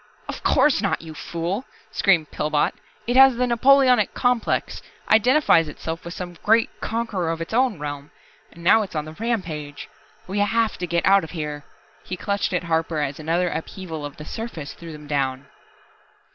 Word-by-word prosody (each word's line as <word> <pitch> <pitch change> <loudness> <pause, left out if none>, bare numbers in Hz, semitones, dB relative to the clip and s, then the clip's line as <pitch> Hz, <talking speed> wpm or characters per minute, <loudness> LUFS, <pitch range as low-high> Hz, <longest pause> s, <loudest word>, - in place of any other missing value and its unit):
"Of - - -6
course 295 -7 +3
not, 200 -5 -1
you 160 -1 -9
fool!" 170 +8 -3 0.3
screamed 175 -7 +2
Pillbot. 150 -1 0 0.3
"It 245 - -1
has 265 -1 +8
the 250 +1 +1
Napoleonic 250 -2 +4
complex, 245 -2 0 0.3
identifies 225 - +5
itself 160 +2 -6
with 170 +1 -7
some 175 -2 -7
great 225 +2 +3
conqueror 220 -7 -2
of 165 0 -2
its 165 +5 -6
own 250 -4 +2
realm. 145 -1 -6 0.4
And 170 - -14
now 220 +6 +6
it's 195 -5 -6
on 150 -1 -2
the 155 - -9
rampage. 160 -9 -4 0.4
We 195 +2 -3
have 225 +2 +1
to 180 - -3
get 170 0 0
out 195 -1 +5
of 160 - -7
here 150 -1 -4 0.2
" - - -31
He 185 - -3
clutched 200 +2 -1
at 180 -1 -1
Harper 165 -1 -1
as 145 -1 -2
another 170 +3 0
upheaval 160 -1 -6
of 145 -1 -7
the 150 - -9
surface 170 -8 -6
threw 170 -1 -10
them 150 -1 -10
down. 135 -2 -1
175 Hz, 180 wpm, -23 LUFS, 155-225 Hz, 0.4 s, has